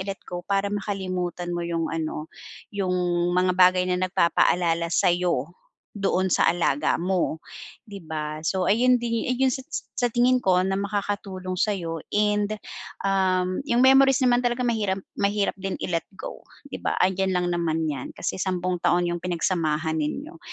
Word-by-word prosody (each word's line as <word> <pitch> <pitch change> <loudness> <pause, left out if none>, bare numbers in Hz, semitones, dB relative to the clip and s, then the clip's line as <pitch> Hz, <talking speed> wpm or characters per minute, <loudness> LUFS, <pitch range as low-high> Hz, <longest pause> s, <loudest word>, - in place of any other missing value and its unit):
i-let 195 0 -5
go 175 0 -5
para 200 +1 0
makalimutan 185 -3 -3
mo 175 - -2
'yong, 170 -1 -1
ano, 155 -1 -3 0.5
'yong 190 -3 -1 0.4
mga 180 0 +3
bagay 185 0 +5
na 180 0 +1
nagpapaalala 170 -1 +2
sa'yo 175 -5 +1 0.4
doon 190 -2 0
sa - - +3
alaga 165 -5 +1
mo, 180 -3 -1 0.4
'di 200 -2 -8
ba? 155 -1 -4
So 190 +1 +1
ayun 250 +4 +4
din 230 -1 -1
yu 250 - +1
ah, - - -6
'yong 265 - +4
sa 265 - -5 0.4
sa 245 - +3
tingin 250 +1 +4
ko 180 -1 +3
na 190 +1 0
makakatulong 200 -2 -3
sa 210 +1 +2
'yo 165 -3 -4 0.2
and, 210 0 +1 0.5
um, 185 -2 +1
'yong 240 +1 +3
memories 270 0 +6
naman 245 -1 +4
talaga 245 +1 0
mahiram 205 -5 0 0.2
mahirap 200 0 +1
din 195 0 -3
i-let 170 -2 -2
go, - - -8 0.3
'di - - -5
ba? - - 0
Andiyan 190 0 +1
lang 180 0 +1
naman 160 -2 0
'yan 135 -3 -6
kasi 180 - -3
10 185 -1 -1
taon 175 0 +2
'yong 175 - -2
pinagsamahan 165 -3 0
ninyo. 275 - -4
185 Hz, 165 wpm, -25 LUFS, 175-205 Hz, 0.5 s, memories